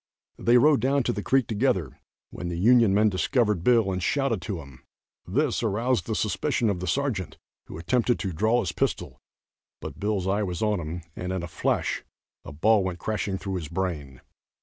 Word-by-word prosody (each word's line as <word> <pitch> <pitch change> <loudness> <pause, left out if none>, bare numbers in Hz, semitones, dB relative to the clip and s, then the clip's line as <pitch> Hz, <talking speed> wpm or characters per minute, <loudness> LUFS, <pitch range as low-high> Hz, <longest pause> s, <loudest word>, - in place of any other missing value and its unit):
They 120 +1 +4
rode 145 +2 +5
down 135 +3 +1
to - - 0
the 105 - -3
creek 135 +3 +2
together, 100 - -1 0.3
when 90 - -6
the 85 -1 -3
Union 115 +2 +5
men 105 +2 +4
discovered 105 - +1
Bill 115 -4 +3
and 90 -1 -2
shouted 135 -3 0
to 95 -1 -4
him. 70 -4 -13 0.5
This 135 - 0
aroused 115 +3 0
the 110 - -1
suspicion 110 - 0
of 90 - -3
the 90 - -4
sergeant, 110 - -2 0.3
who - - -8
attempted 120 +7 +1
to 95 -4 -4
draw 110 +8 +2
his 90 - -2
pistol, - - -2 0.6
but - - -8
Bill's 100 -3 -1
eye 100 +2 +1
was 90 -1 -3
on 105 -3 +1
him, 85 +1 -6
and 90 0 -4
in 95 -2 -3
a - - -4
flash - - -1 0.4
a - - -9
ball 100 +8 +3
went 90 -2 -3
crashing 100 +1 -2
through 95 -1 -4
his 80 -4 -5
brain. 75 -7 -4
100 Hz, 195 wpm, -26 LUFS, 90-120 Hz, 0.6 s, rode